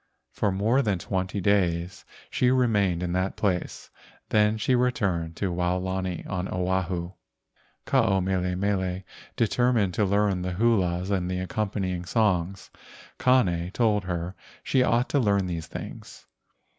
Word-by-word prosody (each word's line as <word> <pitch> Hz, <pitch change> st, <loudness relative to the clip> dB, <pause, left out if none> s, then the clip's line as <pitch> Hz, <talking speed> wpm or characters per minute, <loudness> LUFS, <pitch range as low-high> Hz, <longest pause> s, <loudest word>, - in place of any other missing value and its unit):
For 100 Hz, -, 0 dB
more 110 Hz, +8 st, +2 dB
than 105 Hz, -7 st, 0 dB
twenty 95 Hz, +2 st, -2 dB
days 90 Hz, -2 st, 0 dB, 0.3 s
she 125 Hz, -, +2 dB
remained 105 Hz, -9 st, +2 dB
in 90 Hz, -, -2 dB
that 95 Hz, +1 st, -1 dB
place. 90 Hz, -4 st, -2 dB, 0.4 s
Then 105 Hz, 0 st, +3 dB
she 120 Hz, +4 st, +1 dB
returned 100 Hz, -10 st, 0 dB
to 95 Hz, -1 st, -2 dB
Waolani 90 Hz, +1 st, -2 dB
on 95 Hz, -1 st, -3 dB
Oahu. 90 Hz, -1 st, -1 dB, 0.7 s
Ke -, -, -12 dB
ao 95 Hz, 0 st, +4 dB
mele 90 Hz, -1 st, 0 dB
mele 95 Hz, -1 st, -1 dB, 0.3 s
determined 115 Hz, -3 st, +2 dB
to 105 Hz, -, +1 dB
learn 100 Hz, -1 st, +1 dB
the 90 Hz, 0 st, -3 dB
hulas 95 Hz, -3 st, +1 dB
and 90 Hz, -2 st, 0 dB
the 90 Hz, -, -2 dB
accompanying 95 Hz, -1 st, -2 dB
songs. 95 Hz, -3 st, 0 dB, 0.5 s
Kane 90 Hz, -10 st, +2 dB
told 105 Hz, -5 st, +2 dB
her 90 Hz, 0 st, -3 dB, 0.3 s
she 130 Hz, -, +2 dB
ought 120 Hz, 0 st, +2 dB
to 145 Hz, -, +2 dB
learn 100 Hz, -5 st, +2 dB
these 85 Hz, -3 st, -4 dB
things. -, -, -9 dB
95 Hz, 140 wpm, -26 LUFS, 90-105 Hz, 0.7 s, ao